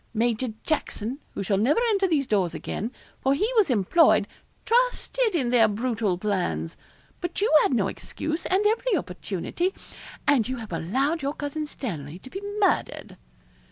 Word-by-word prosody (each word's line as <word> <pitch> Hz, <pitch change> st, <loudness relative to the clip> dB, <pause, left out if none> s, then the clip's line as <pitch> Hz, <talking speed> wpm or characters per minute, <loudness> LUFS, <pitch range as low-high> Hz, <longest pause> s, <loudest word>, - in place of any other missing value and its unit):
Major 235 Hz, +2 st, +1 dB, 0.2 s
Jackson 265 Hz, -4 st, -2 dB, 0.2 s
who -, -, -2 dB
shall 195 Hz, 0 st, +1 dB
never 260 Hz, -, +3 dB
enter 395 Hz, -3 st, +2 dB
these 300 Hz, -6 st, +1 dB
doors 195 Hz, -7 st, +1 dB
again 225 Hz, +5 st, -4 dB, 0.3 s
for 270 Hz, +1 st, +3 dB
he 410 Hz, +10 st, +1 dB
was 425 Hz, -8 st, +4 dB
employed 245 Hz, -, +4 dB, 0.4 s
trusted -, -, +2 dB
in 255 Hz, -7 st, +1 dB
their 230 Hz, -3 st, +6 dB
brutal 220 Hz, -3 st, -1 dB
plans; 175 Hz, -, -2 dB, 0.4 s
but 350 Hz, -1 st, -3 dB
you 410 Hz, -4 st, +2 dB
had -, -, +2 dB
no 200 Hz, -5 st, +2 dB
excuse 315 Hz, -, -4 dB
and 385 Hz, +3 st, +2 dB
every 450 Hz, +1 st, +2 dB
opportunity 205 Hz, -, -3 dB, 0.5 s
and 265 Hz, -7 st, +3 dB
you 260 Hz, -, -2 dB
have 220 Hz, -6 st, -7 dB
allowed 270 Hz, -, 0 dB
your 280 Hz, +2 st, -2 dB
Cousin 300 Hz, +1 st, -4 dB
Stanley 165 Hz, -, -6 dB
to 260 Hz, +7 st, -13 dB
be 390 Hz, -, -5 dB, 0.2 s
murdered.' 400 Hz, -, 0 dB
260 Hz, 155 wpm, -26 LUFS, 205-340 Hz, 0.5 s, their